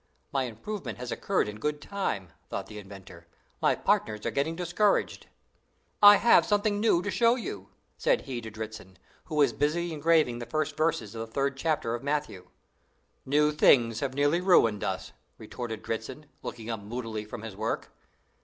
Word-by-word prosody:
"My 135 -2 0
improvement 175 - -6
has 125 -1 -6
occurred 195 - 0
in 105 0 -7
good 150 +4 -2
time," 105 - -3 0.2
thought - - -4
the 105 - -9
inventor; 95 -4 -12 0.3
"my - - +3
partners 105 -1 0
are - - 0
getting 150 +4 -1
discouraged." 180 +4 0 0.7
"I 205 0 +11
have 235 +3 +5
something 205 0 +1
new 205 -5 +3
to 205 - -2
show 235 0 +4
you," 100 - -6 0.3
said - - +2
he 125 -3 -5
to 110 - -7
Dritzhn, 110 -3 -8 0.3
who 155 - -6
was 140 -5 +4
busy 165 +4 0
engraving 155 -5 +2
the 120 - -6
first 155 +3 -1
verses 150 -9 0
of 115 - -5
the 115 0 -7
third 140 +3 0
chapter 140 -5 -1
of 120 - -3
Matthew. 140 -10 -3 0.8
"New 150 +2 +3
things 120 -6 +4
have 135 0 -3
nearly 145 +5 +2
ruined 115 - +4
us!" - - -3 0.3
retorted 115 -3 -6
Dritzhn, 120 +6 -5 0.2
looking 115 -1 -6
up 115 - -3
moodily 110 +1 -5
from 110 +1 -8
his 110 -3 -7
work. 110 +3 -3
130 Hz, 175 wpm, -28 LUFS, 110-160 Hz, 0.8 s, I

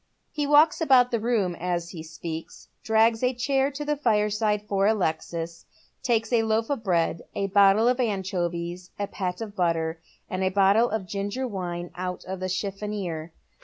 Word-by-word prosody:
He 295 -2 -2
walks 300 +3 +5
about 255 -5 +5
the 235 - +1
room 215 -5 +1
as 175 -1 -2
he 165 - -7
speaks, 160 0 -8
drags 225 +1 +3
a 250 0 +1
chair 270 +2 +1
to 290 +1 -6
the 295 0 +1
fireside 210 -4 +1
for 200 -1 +1
Alexis, 170 -4 -2 0.3
takes 225 -1 0
a 235 - +5
loaf 225 +2 0
of 275 -6 -2
bread, 170 -4 +1
a 200 - 0
bottle 200 +3 +5
of 250 +1 +2
anchovies, 180 -5 -2
« 200 - -5
pat 180 0 -3
of 210 -2 -6
butter, 165 -3 0 0.3
and 185 0 -2
a 190 - +3
bottle 200 +5 +4
of 215 -3 -2
ginger 205 +7 -3
wine 175 -5 -5
out 180 +1 -5
of 190 0 -5
the 185 0 -3
chiffonier. 190 -4 -3
200 Hz, 170 wpm, -26 LUFS, 180-230 Hz, 0.3 s, walks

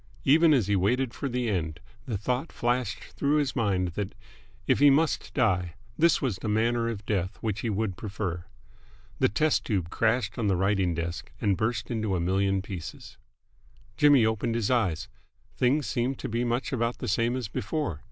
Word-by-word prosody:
Even 160 +4 +5
as 130 -8 +4
he 100 +1 +1
waited 115 +6 +1
for 140 - -3
the 125 -1 -1
end 85 -6 -2 0.3
the 115 -5 -1
thought 125 - -2
flashed 120 +1 -1
through 145 +1 +1
his 145 -3 +1
mind 95 -7 +1
that, 95 +2 -4 0.5
if - - +2
he 145 0 +7
must 155 +3 +2
die, 90 - +1 0.2
this 170 0 +4
was 125 -9 -1
the - - -5
manner 115 +2 +1
of 105 -3 -6
death 95 -4 -1
which 110 -2 -2
he 115 - -2
would 105 -2 -1
prefer. 95 -3 -4 0.8
The - - +4
test 150 +9 +1
tube 95 -7 -2
crashed 115 0 0
on 110 - 0
the 95 - +3
writing 95 -2 +1
desk, 85 +1 -4
and 100 -4 +2
burst 115 +4 -2
into 110 -4 -1
a - - 0
million 95 +2 +1
pieces.... 90 -5 -8 0.8
Jimmy 145 -5 +5
opened 110 +1 0
his 115 0 0
eyes. 95 -10 +1 0.5
Things 135 +3 +2
seemed 125 +1 -1
to - - -5
be 115 +2 -1
much 120 +3 -1
about 115 -1 0
the - - -5
same 115 +4 +1
as 125 -4 -3
before. 105 - -3
110 Hz, 185 wpm, -27 LUFS, 95-125 Hz, 0.8 s, he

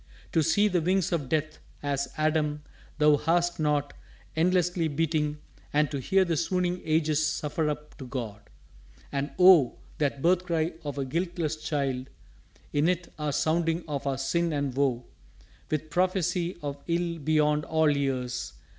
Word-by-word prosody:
To 165 - +3
see 205 +7 +3
the 180 -4 +1
wings 185 +1 +1
of 150 -7 -1
Death, 155 0 -1 0.2
as, 140 -1 -1
Adam, 155 -1 0 0.3
thou 150 -1 +5
Hast 170 +3 +1
not, 150 -2 +1 0.4
endlessly 175 0 +2
beating, 150 0 0 0.3
and 150 -1 +2
to 140 - -2
hear 190 +8 +3
The 170 -2 0
swooning 180 +1 0
ages 155 -1 +2
suffer 150 0 -1
up 150 0 -6
to 130 - -7
God! 115 -6 -6 0.6
And 140 +1 -1
Oh, 180 -8 +7 0.2
that 140 -2 -1
birth 180 +1 +3
cry 165 -1 0
of 145 -2 -5
a 135 - -1
guiltless 170 +1 -2
child 135 -4 -2 0.6
In 150 +3 +3
it 180 -1 -2
are 150 -1 -1
sounding 165 +3 +1
of 145 -2 -3
our 135 -1 0
sin 165 +6 0
and 140 -3 -1
woe, 130 -3 +1 0.6
With 155 0 -2
prophesy 180 0 0
of 140 -1 -4
ill 170 0 -1
beyond 150 0 +2
all 160 -2 +2
years! 130 - -2
155 Hz, 155 wpm, -28 LUFS, 145-170 Hz, 0.6 s, Oh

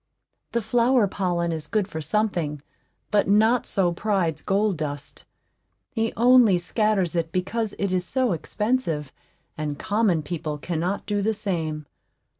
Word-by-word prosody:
The 235 -1 0
flower 235 +2 +3
pollen 175 -3 -1
is 155 -2 -4
good 210 0 0
for 160 -5 -5
something, 160 -4 -1 0.5
but 210 -1 +3
not 220 +4 +3
so 185 -3 +1
pride's 185 -5 0
gold 200 -1 +1
dust. 145 -2 -6 0.7
He 225 0 0
only 240 -5 +6
scatters 190 0 0
it 165 -1 -1
because 205 +5 -2
it 200 -2 -1
is 185 -1 +1
so 255 +6 +1
expensive, 170 - -1 0.5
and 150 -2 -3
common 200 -4 +1
people 155 -1 -4
cannot 175 +5 -2
do 205 -1 -1
the 220 +2 0
same. 160 -7 -3
190 Hz, 140 wpm, -24 LUFS, 160-215 Hz, 0.7 s, only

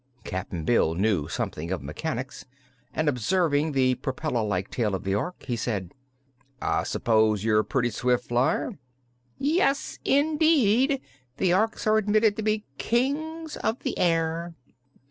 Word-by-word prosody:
Cap'n 90 -3 -4
Bill 85 -9 +3
knew 95 -5 +1
something 80 +2 -4
of 95 -4 -3
mechanics, 130 - -5 0.5
and 155 - -1
observing 150 - +1
the 130 -1 +3
propeller 130 -2 -2
like 100 -2 -2
tail 105 -5 0
of 95 - -5
the 95 - -1
Ork 175 - -3
he 125 - -2
said: 105 -6 -3 0.7
"I - - 0
s'pose 110 -3 +2
you're 110 -1 +3
a - - +2
pretty 120 -1 0
swift 125 +3 0
flyer?" 120 +3 0 0.6
"Yes, 285 -1 +1
indeed; 285 -3 +3 0.4
the 185 - +2
Orks 220 +5 +1
are 215 0 +4
admitted 215 0 +3
to - - -2
be 215 0 0
Kings 310 +6 -1
of 225 - -1
the - - -2
Air." 165 0 0
145 Hz, 145 wpm, -26 LUFS, -, 0.7 s, are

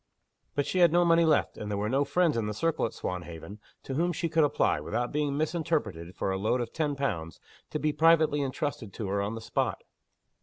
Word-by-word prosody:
But 145 - +1
she 185 - -1
had 175 -3 +6
no 175 +1 +4
money 170 0 +5
left; 155 -2 +2
and 105 - -5
there 100 - -1
were 105 +1 -1
no 135 +5 +2
friends, 175 0 +2
in 115 -2 -1
the 105 - -3
circle 165 -1 0
at - - -10
Swanhaven, 85 +2 -6 0.2
to 135 - -5
whom 170 +6 +1
she 170 0 -2
could 160 0 +3
apply, 145 - +2
without 120 0 -2
being 145 -1 0
misinterpreted, 150 - -2
for 95 - -1
a 95 - -2
loan 110 +5 +1
of 120 - -4
ten 150 -3 -1
pounds, 85 - -3 0.3
to - - -2
be 150 0 0
privately 155 -1 +4
intrusted 135 - -3
to 105 -4 -4
her 100 +1 0
on 100 +3 -2
the 115 - -6
spot. - - -2
140 Hz, 225 wpm, -29 LUFS, 105-160 Hz, 0.3 s, had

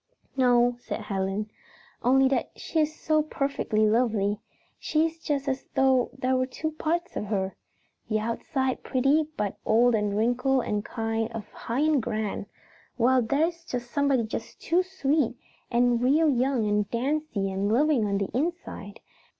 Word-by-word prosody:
"No," 245 -2 +3
said 245 - -5
Helen, 195 +1 -2 0.5
"only 265 +2 +4
that 270 - 0
she 325 - -2
is 310 0 0
so 310 0 +2
perfectly 275 -7 0
lovely. 215 -2 +1 0.4
She 310 +1 +1
is 325 0 -4
just 285 -3 -2
as 265 -1 -2
though 265 -2 +3
there 260 0 +1
was 255 0 0
two 315 +4 -3
parts 335 +3 -2
to - - -3
her. 195 -2 -2 0.5
The 215 - +2
outside 255 +4 -2
pretty, 275 +4 +2
but 205 -2 -2
old 235 +2 +4
and 210 -2 0
wrinkled 250 +3 +2
and 205 -1 -1
kind 225 0 -2
of 215 -2 -6
high 235 +4 -3
and 305 -3 +3
grand, 215 -2 -3 0.5
while 255 +1 +4
there 280 +8 +2
is 335 -1 -14 0.2
somebody 275 -1 +1
just 220 - -6
too 345 +2 +2
sweet, 300 -9 0 0.3
and 240 0 +2
real 295 +6 +4
young 250 -3 +1
and 205 -1 +1
dancy 245 -5 -1
and 195 +2 -1
loving 260 -2 +3
on 200 0 0
the 195 -1 -2
inside. 285 - -3
250 Hz, 160 wpm, -27 LUFS, 215-285 Hz, 0.5 s, only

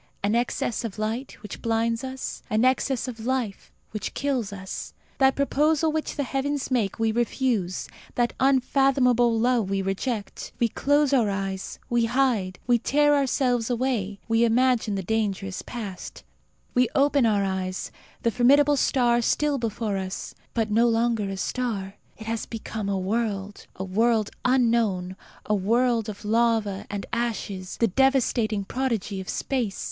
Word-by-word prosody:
An 205 +1 +1
excess 235 0 0
of 220 -3 -5
light, 225 +5 -3
which 210 - -8
blinds 230 +1 0
us; 260 0 -5
an 215 +3 +2
excess 260 0 +1
of 240 -3 -6
life, 240 -3 -2 0.2
which 215 - -5
kills 260 -8 -1
us. 190 -1 -7 0.2
That 265 -1 +4
proposal 300 +3 +2
which 315 0 -2
the 285 - -1
heavens 275 +1 -2
make 225 -7 0
we 225 -1 +1
refuse; 235 -5 -1 0.3
that 240 -1 +1
unfathomable 260 -3 +3
love 235 -4 +2
we 195 -1 0
reject. 200 +2 -3
We 235 - +2
close 285 +4 +2
our 235 -6 +3
eyes; 195 -1 -3
we 240 -1 +2
hide; 230 -7 +1
we 240 -1 +3
tear 295 +4 +3
ourselves 255 -4 +1
away; 230 -5 -1
we 225 0 +3
imagine 235 -2 +2
the 195 - -3
danger 205 -1 -1
is 195 -1 -5
past. 205 -7 -7 0.5
We 250 -1 +3
open 280 -3 +4
our 205 -2 +2
eyes: 190 -1 -3 0.3
the 230 - +2
formidable 280 +5 +4
star 245 -3 +3
is 235 - 0
still 295 -2 +1
before 220 -3 -2
us; 190 0 -5 0.2
but, 220 -2 0
no 230 +3 +4
longer 225 -3 +1
a 195 - -4
star, 200 -4 -2 0.2
it 220 - -9
has 225 0 -3
become 220 -2 -5
a 195 - 0
world 200 0 -2
a 190 - -5
world 215 +3 +1
unknown, 230 -8 +2 0.3
a 215 - 0
world 230 +3 +2
of 210 0 -8
lava 220 -3 +1
and 205 -1 -4
ashes; 210 -5 -3
the 230 - +3
devastating 235 -3 +2
prodigy 220 -6 -2
of 185 - -9
space. 245 -7 -2
230 Hz, 155 wpm, -25 LUFS, 205-255 Hz, 0.5 s, That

